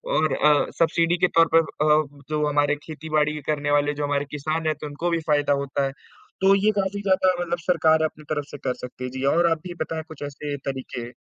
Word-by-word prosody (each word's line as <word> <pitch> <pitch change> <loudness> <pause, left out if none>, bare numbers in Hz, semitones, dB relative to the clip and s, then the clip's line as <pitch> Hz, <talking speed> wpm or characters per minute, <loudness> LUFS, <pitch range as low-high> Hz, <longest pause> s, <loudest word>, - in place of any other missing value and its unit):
और 155 0 +2
अ, 150 -1 +4
सब्सिडी 165 +1 +2
के - - +4
तौर 165 - +6
पर 165 - +8
अ, 155 0 +2 0.3
जो 150 -1 0
हमारे 145 0 +2
खेती-बाड़ी 155 -1 -1
करने 145 -1 0
वाले 145 0 +2
जो 145 0 -4
हमारे 145 0 0
किसान 150 +2 -2
रहते 160 -1 -1
हैं 155 - 0
तो 150 - -4
उनको 155 +4 -3
भी 170 - +1
फायदा 145 -1 +3
होता 140 0 -1
है, 135 - -2 0.5
तो 195 +1 +6
ये 215 - +5
काफ़ी 200 +1 -2
ज़्यादा 190 -1 +3
मतलब 175 0 -2
सरकार 160 -2 +4
अपनी 155 0 -6
तरफ 145 -2 -1
से 145 - -7
कर - - +1
सकती 125 0 -10
है 125 - -3
जी - - -3
और 170 -1 +3
आप 160 - +1
भी 175 - -6
बताएँ 160 0 -3
कुछ 160 - -9
ऐसे 145 0 -5 0.2
तरीके। 125 -2 -7
155 Hz, 230 wpm, -24 LUFS, 145-165 Hz, 0.5 s, पर